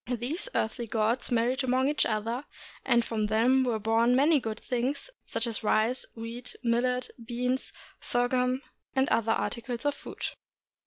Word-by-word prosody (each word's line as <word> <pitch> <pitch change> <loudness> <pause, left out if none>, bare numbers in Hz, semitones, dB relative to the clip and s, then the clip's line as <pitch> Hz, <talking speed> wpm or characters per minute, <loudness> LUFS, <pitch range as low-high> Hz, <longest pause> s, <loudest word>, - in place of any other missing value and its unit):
These 260 - -2
earthly 235 +2 -1
gods 225 +3 0
married 245 +3 +1
among 260 +1 +2
each 295 +1 +2
other, 230 +5 -2 0.4
and 235 -1 +3
from 215 -2 -1
them 240 +5 +4
were 240 -3 +1
born 225 +3 +3
many 290 +3 +5
good 220 -3 -4
things, 260 - -2 0.2
such 230 +1 +1
as 230 -3 -1
rice, 220 +4 +2
wheat, 230 +2 -7
millet, 250 +1 +1
beans, 250 +2 -1 0.3
sorghum, 250 +2 +1 0.3
and 265 +1 +3
other 225 0 +2
articles 235 +2 -2
of 290 - +3
food. - - -7
245 Hz, 150 wpm, -29 LUFS, 230-255 Hz, 0.4 s, many